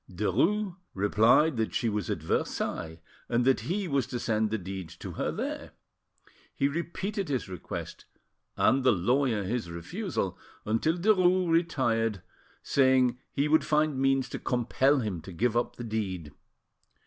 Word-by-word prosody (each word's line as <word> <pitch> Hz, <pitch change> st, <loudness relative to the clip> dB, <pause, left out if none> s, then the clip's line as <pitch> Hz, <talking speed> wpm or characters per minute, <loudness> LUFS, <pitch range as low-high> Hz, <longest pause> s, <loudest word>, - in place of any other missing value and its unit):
Derues 165 Hz, -, 0 dB, 0.2 s
replied 115 Hz, +9 st, +4 dB
that 110 Hz, -1 st, -1 dB
she 120 Hz, -, +1 dB
was 105 Hz, -3 st, -2 dB
at -, -, -3 dB
Versailles, 80 Hz, 0 st, -2 dB, 0.3 s
and 120 Hz, 0 st, +2 dB
that 130 Hz, -3 st, +4 dB
he 180 Hz, -, -2 dB
was 140 Hz, -4 st, 0 dB
to 125 Hz, -2 st, -4 dB
send 110 Hz, -2 st, 0 dB
the 110 Hz, -, -1 dB
deed 95 Hz, -2 st, -6 dB
to 85 Hz, -, -8 dB
her -, -, -2 dB
there. -, -, -5 dB, 0.8 s
He 140 Hz, -, +2 dB
repeated 175 Hz, +5 st, -3 dB
his 130 Hz, -4 st, -1 dB
request 90 Hz, -3 st, -7 dB, 0.5 s
and 135 Hz, 0 st, +3 dB
the 130 Hz, -, +6 dB
lawyer 115 Hz, +3 st, +1 dB
his 110 Hz, -1 st, -2 dB
refusal, 95 Hz, -, -4 dB, 0.3 s
until 115 Hz, +10 st, +1 dB
Derues 185 Hz, -2 st, +3 dB
retired, 120 Hz, -, +1 dB, 0.4 s
saying 130 Hz, -2 st, +3 dB
he 140 Hz, +1 st, 0 dB
would 155 Hz, +1 st, +4 dB
find 150 Hz, -2 st, +1 dB
means 135 Hz, -1 st, +2 dB
to -, -, -5 dB
compel 130 Hz, +3 st, +2 dB
him 100 Hz, -7 st, -3 dB
to 95 Hz, -, -10 dB
give 115 Hz, +7 st, 0 dB
up 120 Hz, -, 0 dB
the 120 Hz, -, -7 dB
deed. 95 Hz, -9 st, -3 dB
125 Hz, 150 wpm, -28 LUFS, 105-150 Hz, 0.8 s, the